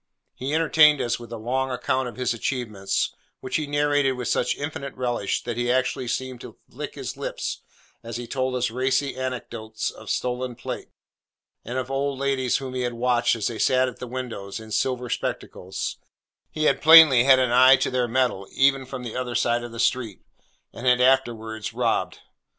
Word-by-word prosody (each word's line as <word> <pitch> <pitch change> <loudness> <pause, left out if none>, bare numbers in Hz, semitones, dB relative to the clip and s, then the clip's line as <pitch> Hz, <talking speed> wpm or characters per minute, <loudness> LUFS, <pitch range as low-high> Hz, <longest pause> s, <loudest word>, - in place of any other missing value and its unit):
He 135 +4 -3
entertained 155 -2 +5
us 120 0 -1
with 120 -1 -11
a 115 - -5
long 130 +4 -1
account 130 +1 -1
of - - -12
his 125 -1 -1
achievements, 110 -5 -2 0.3
which 130 - -2
he 155 -2 -3
narrated 145 -2 +2
with 125 -1 -4
such 125 - 0
infinite 140 -1 -5
relish, 120 -5 -2
that 120 -1 -4
he 120 0 0
actually 125 0 0
seemed 130 +1 -3
to - - -11
lick - - -7
his - - -6
lips - - -4 0.4
as 115 0 -6
he 120 - -6
told 130 +1 -2
us 125 -2 0
racy 130 +3 0
anecdotes 120 -4 -4
of - - -12
stolen 125 0 -2
plate, - - -6 0.7
and 125 - -5
of 130 0 -3
old 135 0 -1
ladies 135 -2 0
whom 130 -2 -6
he 130 - -2
had 120 -1 -2
watched 120 0 +2
as 110 -3 -4
they 115 - -2
sat 130 0 +3
at 125 - -8
windows 115 -6 -5
in 110 0 -11
silver 125 +2 -1
spectacles 95 -5 -4 0.5
(he 155 - -3
had - - +2
plainly 155 -6 +9
had 135 -1 +7
an 130 -2 +1
eye 130 +2 +7
to - - -1
their 125 -1 0
metal 120 -6 0
even 135 -1 +2
from 130 -2 -6
the 120 - -6
other 125 -1 -3
side 120 +1 +1
of 120 - -7
the 115 - -8
street) 115 -3 -1 0.5
and 120 - -5
had 125 0 +5
afterwards 115 -4 +1
robbed. - - -1
125 Hz, 190 wpm, -24 LUFS, 120-130 Hz, 0.7 s, plainly